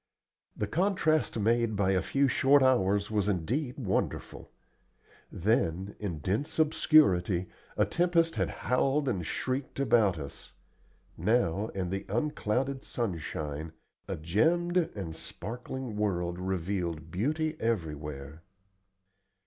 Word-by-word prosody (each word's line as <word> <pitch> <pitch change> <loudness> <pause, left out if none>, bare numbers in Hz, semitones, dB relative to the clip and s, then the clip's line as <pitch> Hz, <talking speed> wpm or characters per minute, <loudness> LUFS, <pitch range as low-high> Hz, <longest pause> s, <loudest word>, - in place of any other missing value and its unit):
The 105 - 0
contrast 155 - +1
made 115 +1 +2
by 100 -1 +2
a 95 -1 +2
few 140 +8 +2
short 135 +2 +4
hours 100 -5 +2
was 105 -2 +1
indeed 125 - -1
wonderful. 105 -9 -2 0.8
Then, 95 -1 0
in 95 -6 -3
dense 115 - -2
obscurity, 100 - +4 0.3
a - - +4
tempest 170 -1 +2
had - - 0 0.2
howled 135 +3 +2
and 100 -9 0
shrieked 130 - -3
about 110 -9 +3
us; 70 -2 -9 0.7
now, 110 -3 +1
in 90 -2 -2
the 95 0 -3
unclouded 130 +2 -1
sunshine, 80 - -4 0.3
a - - -2
gemmed 160 - +1 0.2
and 85 -6 -5
sparkling 120 +6 -6
world 90 -4 -1
revealed 90 -3 -2
beauty 155 - 0
everywhere. 75 -8 -3
105 Hz, 110 wpm, -30 LUFS, 90-135 Hz, 0.8 s, short